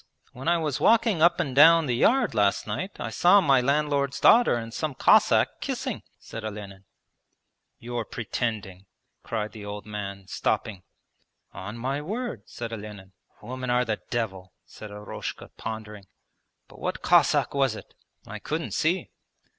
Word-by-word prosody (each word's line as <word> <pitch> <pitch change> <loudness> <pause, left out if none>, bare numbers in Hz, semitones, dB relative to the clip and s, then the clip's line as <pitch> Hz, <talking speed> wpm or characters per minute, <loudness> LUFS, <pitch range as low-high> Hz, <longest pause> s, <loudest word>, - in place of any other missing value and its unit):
When 130 +5 -8
I 170 0 +4
was 155 -5 -2
walking 225 -6 +3
up 170 +1 +5
and 140 -7 -2
down 165 +3 +7
the 125 -4 0
yard 240 - +3
last 105 -2 +2
night, 120 - -5
I - - -4
saw 180 +4 +5
my 140 -8 +4
landlord's 140 0 0
daughter 240 - +6
and 115 -1 -5
some 150 +1 -3
Cossack - - +4
kissing,' - - -3 0.2
said 115 - -9
Olenin. 100 -2 -8 0.9
'You're 120 -1 -4
pretending!' 105 -5 -4 0.3
cried 110 -2 -3
the 110 - -10
old 105 0 -7
man, 100 -2 -6
stopping. 100 -1 -2 0.7
'On 95 +6 -7
my 135 +4 -2
word,' 200 - -5
said 115 -1 -6
Olenin. 105 -3 -9 0.3
'Women 130 0 -5
are 125 +1 +2
the 110 -2 -3
devil,' 95 -6 -3
said 110 - -11
Eroshka 105 0 -7
pondering. 105 -2 -7 0.6
'But - - -16
what - - -4
Cossack - - +3
was 135 -5 +1
it?' - - -12 0.3
'I - - -8
couldn't - - -4
see.' - - 0
120 Hz, 150 wpm, -26 LUFS, 105-145 Hz, 0.9 s, down